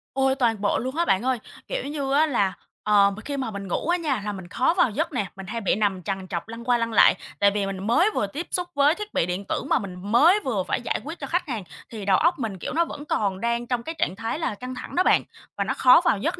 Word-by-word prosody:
Ôi! 265 Hz, 0 st, +2 dB
Toàn 230 Hz, -5 st, +1 dB
bộ 205 Hz, -, +1 dB
luôn 260 Hz, +4 st, -4 dB
á 340 Hz, -, +1 dB
bạn 195 Hz, -, +2 dB
ơi! 255 Hz, -3 st, +1 dB, 0.3 s
Kiểu -, -, -3 dB
như 280 Hz, -2 st, -2 dB
á 305 Hz, +2 st, +5 dB
là, 200 Hz, -10 st, +1 dB, 0.3 s
ờm, 200 Hz, -1 st, +4 dB
mình 220 Hz, -, -10 dB
khi 285 Hz, 0 st, -3 dB
mà 255 Hz, -5 st, -3 dB
mình 200 Hz, -1 st, -6 dB
ngủ 180 Hz, -, -2 dB
á 350 Hz, -, +3 dB
nha 290 Hz, -, -1 dB
là 210 Hz, -, -1 dB
mình 190 Hz, -3 st, -8 dB
khó 255 Hz, -, +1 dB
vào 350 Hz, -, +4 dB
giấc 320 Hz, +11 st, -2 dB
nè, 210 Hz, -, 0 dB
mình 195 Hz, -1 st, -8 dB
hay 230 Hz, +2 st, -4 dB
bị 200 Hz, -, +1 dB
nằm 195 Hz, -4 st, 0 dB
trằn 190 Hz, 0 st, -4 dB
trọc 170 Hz, +2 st, -4 dB
lăn 230 Hz, +1 st, -8 dB
qua 245 Hz, 0 st, +2 dB
lăn 230 Hz, -1 st, -2 dB
lại. -, -, +6 dB, 0.2 s
Tại 200 Hz, 0 st, +5 dB
vì 205 Hz, -1 st, -1 dB
mình 195 Hz, +1 st, -4 dB
mới 340 Hz, -, +4 dB
vừa 205 Hz, -, 0 dB
tiếp 300 Hz, -, -6 dB
xúc 355 Hz, -1 st, -1 dB
với 285 Hz, +3 st, +4 dB
thiết 420 Hz, 0 st, -7 dB
bị -, -, +2 dB
điện 180 Hz, +3 st, -3 dB
tử -, -, -1 dB
mà -, -, +3 dB
mình 185 Hz, -3 st, -7 dB, 0.2 s
mới 330 Hz, -, +6 dB
vừa 210 Hz, -8 st, 0 dB
phải -, -, -2 dB
giải -, -, -2 dB
quyết 320 Hz, +4 st, -7 dB
cho -, -, -5 dB
khách 355 Hz, 0 st, -1 dB
hàng, 230 Hz, -8 st, -3 dB, 0.3 s
thì 215 Hz, -4 st, -7 dB
đầu 190 Hz, -2 st, +4 dB
óc 340 Hz, 0 st, +2 dB
mình, 220 Hz, -6 st, -3 dB
kiểu, -, -, -5 dB
nó 335 Hz, +1 st, +2 dB
vẫn 290 Hz, -, -8 dB
còn 200 Hz, -8 st, -1 dB
đang 235 Hz, 0 st, -1 dB
trong 245 Hz, -2 st, -1 dB
cái 325 Hz, +4 st, -5 dB
trạng 190 Hz, -, 0 dB
thái 225 Hz, +7 st, -3 dB
là 320 Hz, -10 st, -2 dB
căng 250 Hz, +4 st, -7 dB
thẳng -, -, -8 dB
đó 365 Hz, -, +4 dB
bạn, -, -, +4 dB, 0.3 s
và -, -, +1 dB
nó -, -, -1 dB
khó 255 Hz, +6 st, +6 dB
vào 340 Hz, -, +3 dB
giấc 195 Hz, -, -2 dB
235 Hz, 295 wpm, -24 LUFS, 200-295 Hz, 0.3 s, lại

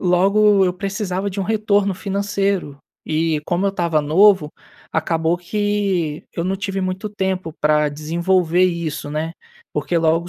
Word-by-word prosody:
logo 195 Hz, +2 st, +4 dB
eu 180 Hz, -, +1 dB
precisava 195 Hz, 0 st, -3 dB
de 195 Hz, -, -6 dB
um 195 Hz, -, +1 dB
retorno 205 Hz, -1 st, +1 dB
financeiro. 195 Hz, -5 st, -2 dB, 0.3 s
E 155 Hz, -1 st, 0 dB
como 180 Hz, +3 st, 0 dB
eu 195 Hz, -, +2 dB
estava 170 Hz, -5 st, 0 dB
novo, 160 Hz, +1 st, +4 dB, 0.4 s
acabou 165 Hz, +1 st, 0 dB
que 195 Hz, -4 st, -1 dB
eu 170 Hz, -, -3 dB
não 190 Hz, +1 st, -1 dB
tive 195 Hz, 0 st, -3 dB
muito 185 Hz, +3 st, -3 dB
tempo 190 Hz, -4 st, -2 dB
para 150 Hz, -1 st, +3 dB
desenvolver 170 Hz, +3 st, +1 dB
isso, 170 Hz, -4 st, -2 dB
né. 155 Hz, +2 st, -3 dB, 0.4 s
Porque 170 Hz, -, -1 dB
logo 165 Hz, +2 st, +1 dB
180 Hz, 145 wpm, -20 LUFS, 160-200 Hz, 0.4 s, logo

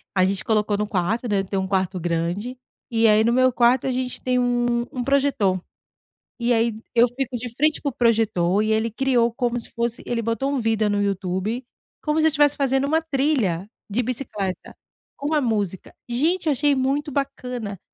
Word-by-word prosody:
A 185 Hz, -, +4 dB
gente 195 Hz, 0 st, -1 dB
colocou 210 Hz, -2 st, +1 dB
no 210 Hz, 0 st, -1 dB
quarto, 210 Hz, +5 st, -1 dB
né, 205 Hz, -2 st, +1 dB
eu 195 Hz, -, -2 dB
tenho 195 Hz, 0 st, -2 dB
1 190 Hz, -, -3 dB
quarto 190 Hz, -1 st, 0 dB
grande, 175 Hz, +9 st, -2 dB, 0.3 s
e 225 Hz, -1 st, +3 dB
aí 215 Hz, +1 st, +5 dB
no 235 Hz, -, +2 dB
meu 255 Hz, +1 st, +4 dB
quarto 245 Hz, +1 st, +3 dB
a -, -, +1 dB
gente 250 Hz, 0 st, -3 dB
tem 250 Hz, 0 st, +1 dB
um 240 Hz, -1 st, +1 dB
um 250 Hz, -2 st, -3 dB
projetor. 265 Hz, -9 st, +1 dB, 0.8 s
E 240 Hz, +1 st, +2 dB
aí 230 Hz, 0 st, +2 dB, 0.2 s
eu 235 Hz, +1 st, +6 dB
fico 255 Hz, 0 st, -3 dB
de 235 Hz, 0 st, -6 dB
frente 305 Hz, +2 st, +2 dB
para 285 Hz, -, 0 dB
o -, -, -6 dB
projetor 215 Hz, -5 st, +2 dB
e 215 Hz, -, 0 dB
ele 220 Hz, +1 st, +1 dB
criou 240 Hz, 0 st, +1 dB
como 245 Hz, -1 st, -1 dB
se -, -, -9 dB
fosse 235 Hz, 0 st, -2 dB
ele 235 Hz, -1 st, -1 dB
botou 230 Hz, +5 st, -1 dB
um 275 Hz, -, 0 dB
vídeo 220 Hz, -2 st, +1 dB
no 205 Hz, 0 st, +1 dB
YouTube 195 Hz, +5 st, -2 dB, 0.4 s
como 305 Hz, +1 st, 0 dB
se 320 Hz, -, +5 dB
eu -, -, +2 dB
tivesse 295 Hz, -1 st, +3 dB
fazendo 270 Hz, 0 st, +1 dB
uma 320 Hz, +2 st, +2 dB
trilha 265 Hz, -, 0 dB, 0.2 s
de 230 Hz, +5 st, 0 dB
bicicleta 225 Hz, -6 st, -4 dB, 0.4 s
com 290 Hz, +3 st, -2 dB
a 300 Hz, -, +3 dB
música. 205 Hz, -6 st, -2 dB, 0.2 s
Gente, 325 Hz, +9 st, +1 dB
eu 300 Hz, -, +3 dB
achei 285 Hz, +2 st, +2 dB
muito 280 Hz, +3 st, 0 dB
bacana. 250 Hz, -7 st, -4 dB
235 Hz, 200 wpm, -23 LUFS, 205-265 Hz, 0.8 s, eu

